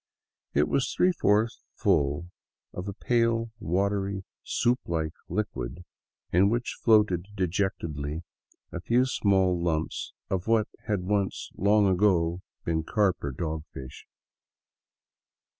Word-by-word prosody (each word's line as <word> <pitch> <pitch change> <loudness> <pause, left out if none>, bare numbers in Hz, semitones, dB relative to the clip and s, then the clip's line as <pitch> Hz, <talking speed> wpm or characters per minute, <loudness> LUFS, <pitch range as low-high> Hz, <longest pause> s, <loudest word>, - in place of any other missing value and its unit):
It 75 - +4
was 135 - +1
three 185 - +3
fourths 110 - +2
full 75 +5 +1 0.4
of 90 +2 -5
a 100 - -3
pale, 115 +1 +1
watery, 100 +2 0 0.2
soup 125 +2 +1
like 80 -2 -1 0.2
liquid 90 - -3 0.5
in 95 +3 +5
which 120 +2 -2
floated 105 -5 +4
dejectedly 85 -5 -2 0.5
a - - -5
few 125 +2 +3
small 95 -7 +2
lumps 80 -2 -1 0.2
of 95 0 -2
what 110 -2 +3 0.2
had 105 -4 0
once 100 0 -1
long 105 +2 +4
ago 90 -3 +2 0.2
been 80 -1 0
carp 100 +1 +1
or 70 - -2
dog 80 +3 -3
fish. 65 -1 -9
95 Hz, 120 wpm, -28 LUFS, 85-105 Hz, 0.5 s, in